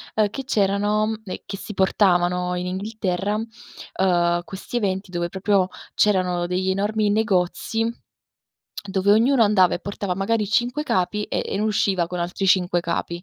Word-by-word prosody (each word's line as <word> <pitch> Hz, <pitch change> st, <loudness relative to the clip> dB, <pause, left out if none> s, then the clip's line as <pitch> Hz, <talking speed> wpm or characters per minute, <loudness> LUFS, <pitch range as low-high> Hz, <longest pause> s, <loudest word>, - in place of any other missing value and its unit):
ehm, 215 Hz, -1 st, +3 dB
che 270 Hz, +6 st, -6 dB
c'erano 210 Hz, -1 st, +1 dB
e 185 Hz, -, -7 dB
che 195 Hz, -, -6 dB
si 210 Hz, -, -8 dB
portavano 180 Hz, -2 st, +2 dB
in 180 Hz, -, -3 dB
Inghilterra, 200 Hz, 0 st, -2 dB
uhm, 185 Hz, -6 st, -1 dB
questi 195 Hz, +6 st, -6 dB
eventi 190 Hz, -3 st, -2 dB
dove 175 Hz, -1 st, -1 dB
proprio 190 Hz, 0 st, +1 dB, 0.3 s
c'erano 180 Hz, -4 st, +2 dB
degli 185 Hz, +1 st, -1 dB
enormi 210 Hz, +2 st, 0 dB
negozi, 215 Hz, +2 st, 0 dB, 1.0 s
dove 195 Hz, +1 st, +1 dB
ognuno 235 Hz, +3 st, +4 dB
andava 200 Hz, -4 st, +4 dB
e 175 Hz, -, -4 dB
portava 200 Hz, -2 st, -3 dB
magari 210 Hz, +3 st, 0 dB
5 240 Hz, +7 st, 0 dB
capi 210 Hz, -4 st, 0 dB
e -, -, -2 dB
e -, -, -3 dB
ne 210 Hz, -, -1 dB
usciva 195 Hz, -5 st, +1 dB
con 180 Hz, +1 st, -5 dB
altri 180 Hz, +3 st, -2 dB
5 180 Hz, -2 st, +3 dB
capi. 170 Hz, 0 st, -3 dB
195 Hz, 155 wpm, -23 LUFS, 180-215 Hz, 1.0 s, ognuno